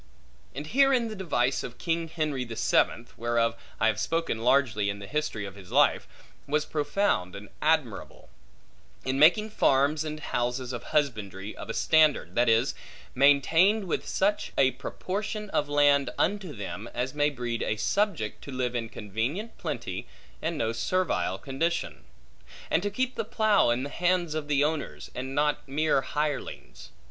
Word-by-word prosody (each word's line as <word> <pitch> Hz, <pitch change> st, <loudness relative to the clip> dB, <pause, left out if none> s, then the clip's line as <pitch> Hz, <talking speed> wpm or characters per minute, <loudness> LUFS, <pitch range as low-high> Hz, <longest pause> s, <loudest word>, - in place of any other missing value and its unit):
And 145 Hz, +2 st, -5 dB
herein 255 Hz, -, +3 dB
the 215 Hz, -, -6 dB
device 140 Hz, -9 st, 0 dB
of 125 Hz, -, -8 dB
king 165 Hz, -1 st, -1 dB
Henry 155 Hz, -5 st, -2 dB
the 115 Hz, -2 st, -7 dB
Seventh 115 Hz, +1 st, +1 dB
(whereof 115 Hz, 0 st, +1 dB, 0.2 s
I -, -, +2 dB
have 110 Hz, -1 st, +2 dB
spoken 165 Hz, -6 st, -1 dB
largely 115 Hz, -4 st, +2 dB
in 100 Hz, -, -3 dB
the 100 Hz, -, -8 dB
History 130 Hz, -3 st, -2 dB
of 100 Hz, -, -7 dB
his 95 Hz, -2 st, -13 dB
Life) -, -, +3 dB, 0.4 s
was 150 Hz, +1 st, +1 dB
profound 145 Hz, -, 0 dB
and 100 Hz, 0 st, -9 dB
admirable; 150 Hz, -7 st, -1 dB, 0.8 s
in 130 Hz, +1 st, 0 dB
making 210 Hz, +8 st, +5 dB
farms 145 Hz, -4 st, +2 dB
and 155 Hz, 0 st, -5 dB
houses 125 Hz, -2 st, -2 dB
of 120 Hz, -, -6 dB
husbandry 105 Hz, -9 st, -2 dB
of -, -, -9 dB
a 115 Hz, -, -3 dB
standard; 155 Hz, -2 st, +3 dB
that 120 Hz, 0 st, +3 dB
is, 115 Hz, +4 st, +3 dB, 0.4 s
maintained 160 Hz, +10 st, +4 dB
with 175 Hz, -, -2 dB
such 205 Hz, +2 st, 0 dB
a 130 Hz, -1 st, +5 dB
proportion 205 Hz, -, -5 dB
of 145 Hz, -, 0 dB
land 145 Hz, -2 st, +4 dB
unto 195 Hz, -2 st, 0 dB
them, 105 Hz, 0 st, -6 dB
as 125 Hz, +2 st, -2 dB
may 145 Hz, 0 st, +2 dB
breed 120 Hz, -4 st, -4 dB
a 110 Hz, -, 0 dB
subject 170 Hz, -, -1 dB
to 140 Hz, -, -7 dB
live 125 Hz, -1 st, -2 dB
in 115 Hz, -2 st, -3 dB
convenient 120 Hz, -, -4 dB
plenty -, -, -4 dB, 0.3 s
and 160 Hz, 0 st, -2 dB
no 115 Hz, -3 st, 0 dB
servile 185 Hz, +11 st, 0 dB
condition; 165 Hz, +5 st, -2 dB, 0.7 s
and -, -, +3 dB
to 205 Hz, -, -1 dB
keep 255 Hz, +5 st, -1 dB
the -, -, -2 dB
plough 215 Hz, -, +3 dB
in 120 Hz, +2 st, +1 dB
the 140 Hz, -, -4 dB
hands 175 Hz, -2 st, +1 dB
of 155 Hz, -2 st, -3 dB
the 145 Hz, -1 st, +2 dB
owners, 155 Hz, -1 st, -3 dB
and 130 Hz, +2 st, -5 dB
not 150 Hz, 0 st, +2 dB
mere 145 Hz, 0 st, +2 dB
hirelings. 150 Hz, 0 st, -4 dB
145 Hz, 165 wpm, -27 LUFS, 120-165 Hz, 0.8 s, making